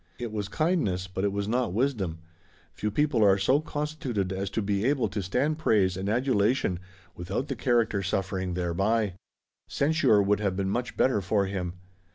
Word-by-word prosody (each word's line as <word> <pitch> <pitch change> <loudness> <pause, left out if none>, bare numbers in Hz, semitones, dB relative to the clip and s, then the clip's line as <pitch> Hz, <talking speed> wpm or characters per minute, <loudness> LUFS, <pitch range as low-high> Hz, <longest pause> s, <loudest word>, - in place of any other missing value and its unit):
It 120 -2 -5
was 105 -2 -3
kindness, 105 - 0
but 95 +1 -4
it 100 - +2
was 100 0 -2
not 120 -4 0
wisdom. 100 -9 -1 0.5
Few 105 - -2
people 135 +1 +2
are 100 -1 +5
so 130 +9 +3
constituted 145 - -3
as 95 +1 -3
to 110 - -2
be 100 0 0
able 130 -2 +2
to 100 +1 -3
stand 135 - 0
praise 100 -10 +2
and 95 +2 -3
adulation 120 -4 +1 0.4
without 95 +11 -3
the 135 - -2
character 115 -4 +1
suffering 95 -1 -2
thereby. 95 +4 0 0.6
Censure 145 -7 +3
would 100 0 +2
have 100 -3 -1
been 95 0 -1
much 120 +3 -3
better 130 -6 +3
for 100 +2 +1
him. 95 -3 -3
105 Hz, 175 wpm, -27 LUFS, 95-125 Hz, 0.6 s, are